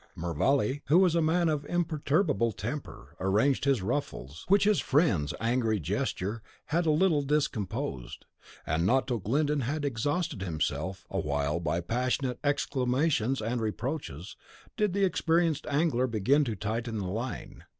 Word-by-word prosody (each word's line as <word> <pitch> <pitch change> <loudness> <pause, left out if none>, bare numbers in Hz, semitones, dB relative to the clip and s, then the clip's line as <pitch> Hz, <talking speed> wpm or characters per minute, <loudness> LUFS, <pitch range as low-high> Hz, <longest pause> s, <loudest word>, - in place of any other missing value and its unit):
Mervale, 130 - +1
who 155 - +5
was 185 -3 +5
a 170 - +2
man 165 +2 +2
of 150 -2 0
imperturbable 155 - +1
temper, 120 +9 -6
arranged 110 +10 +2
his 135 -8 +2
ruffles, 80 - -4
which 200 +1 +5
his 210 -1 +3
friend's 110 - +2
angry 115 -2 +1
gesture 100 +6 -2 0.2
had 165 +2 0
a - - +4
little 155 -1 +3
discomposed, 115 - -2 0.4
and 80 +2 0
not 130 +8 +3
till 120 -3 -1
Glyndon 145 +9 +1
had 145 +4 -2
exhausted 145 - -1
himself 85 +1 -2
awhile 70 +2 -1
by 85 +1 -1
passionate 125 +6 -1
exclamations 135 -3 +1
and 115 +2 -1
reproaches, 110 - -4 0.4
did 210 -5 +1
the 200 0 +3
experienced 165 -3 +1
angler 140 -4 +1
begin 120 +6 +2
to 115 -4 -2
tighten 110 +3 -3
the 100 - -3
line. 115 +7 -5
130 Hz, 140 wpm, -29 LUFS, 105-150 Hz, 0.4 s, who